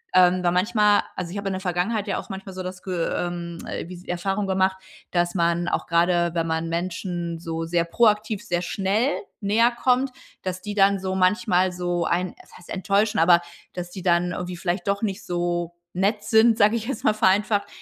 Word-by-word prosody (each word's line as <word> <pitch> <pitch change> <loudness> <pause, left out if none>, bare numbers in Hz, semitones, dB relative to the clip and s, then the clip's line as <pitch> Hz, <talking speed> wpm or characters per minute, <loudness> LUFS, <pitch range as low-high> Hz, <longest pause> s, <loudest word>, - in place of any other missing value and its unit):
ähm, 185 0 +5
weil 175 - +3
manchmal 210 +2 +3
also, 180 -2 -4
ich 195 - -6
habe 200 -1 -2
in - - -3
der 185 - -3
Vergangenheit 190 +4 -1
ja 200 - -1
auch - - -7
manchmal 195 -1 -7
so 185 - -4
das 185 0 -7
Ge 185 - -4 0.2
ähm, 170 -1 -4 0.3
wie 180 - -9
s 180 +1 -13
Erfahrung 195 +3 -2
gemacht, 190 0 +1 0.3
dass 175 0 0
man 170 0 +1
auch - - -1
gerade, 170 0 +2
wenn 165 -1 0
man 160 0 -1
Menschen 175 0 -3
so 165 0 -4
sehr 170 +1 +1
proaktiv, 210 +2 +2
sehr 175 -6 -1
schnell 200 +9 0 0.3
näher 220 +4 +3
kommt 250 +2 +1 0.3
dass 185 -1 -4
die 210 - -4
dann 200 -1 +4
so 190 0 -3
manchmal 185 -1 +2
so 175 -1 -1
einen 180 +2 0
was - - -17
heißt 175 - -17
enttäuschen, 200 +3 +1
aber, 170 +1 +6 0.3
dass 175 0 -6
die 190 - -7
dann 175 0 +2
irgendwie 180 +1 -4
vielleicht 180 +2 -2
doch 200 0 0
nicht 205 -1 -2
so 175 -1 -2 0.2
nett 205 +3 0
sind, 225 +1 +4
sage 210 +2 +4
ich 225 +1 -5
jetzt 255 -2 -4
mal 215 - +4
vereinfacht, 205 0 +2
185 Hz, 200 wpm, -24 LUFS, 175-205 Hz, 0.3 s, aber